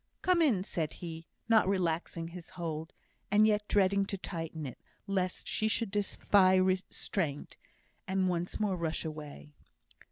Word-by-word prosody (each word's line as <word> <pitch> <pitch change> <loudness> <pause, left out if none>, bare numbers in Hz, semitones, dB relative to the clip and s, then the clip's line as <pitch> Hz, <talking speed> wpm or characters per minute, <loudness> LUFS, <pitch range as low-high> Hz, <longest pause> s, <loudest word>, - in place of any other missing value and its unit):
"Come 365 -2 +4
in," 235 - +3
said 160 -6 -2
he, 165 -1 -8 0.2
not 225 -4 +5
relaxing 170 -3 -1
his 175 0 -10
hold, 160 -2 -4 0.4
and 210 +1 +5
yet 210 -1 +2
dreading 200 0 +3
to 195 - -3
tighten 165 -4 -5
it, 130 - -7 0.3
lest 190 -2 -1
she 215 - +1
should 220 -1 0
defy 200 -2 +3
restraint, 185 -4 0 0.5
and 190 0 +1
once 175 -1 -2
more 205 -3 +1
rush 165 -1 -2
away. 150 -1 -8
185 Hz, 140 wpm, -32 LUFS, 165-200 Hz, 0.5 s, not